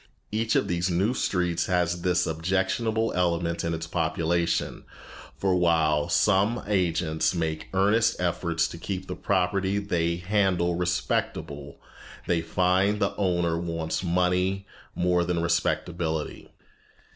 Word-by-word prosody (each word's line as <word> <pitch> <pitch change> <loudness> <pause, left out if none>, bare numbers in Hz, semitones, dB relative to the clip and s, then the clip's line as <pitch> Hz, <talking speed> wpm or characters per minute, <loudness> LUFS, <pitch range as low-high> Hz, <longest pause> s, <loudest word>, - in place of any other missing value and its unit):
Each 110 +1 0
of - - +2
these 90 +1 0
new 95 +7 +1
streets 90 -8 0
has 90 -1 0
this 90 0 +2
objectionable 95 +7 0
element 85 -1 0
in 85 0 -1
its 80 0 -5
population, 85 +1 -1 0.5
for 95 -2 +1
while 80 -4 +2
some 100 +3 +2
agents 85 -4 0
make 80 -2 -2
earnest 100 +4 +2
efforts 85 -2 0
to 85 - -9
keep 95 0 -4
the 90 - -5
property 95 +1 0
they 85 -5 0
handle 90 -1 +1
respectable, 80 -4 -2 0.5
they 85 -2 +1
find 95 +5 +1
the 100 - 0
owner 85 -4 0
wants 85 0 -3
money 90 +2 +1 0.3
more 90 0 +2
than 85 0 -1
respectability. 85 -1 -1
90 Hz, 120 wpm, -26 LUFS, 85-95 Hz, 0.5 s, of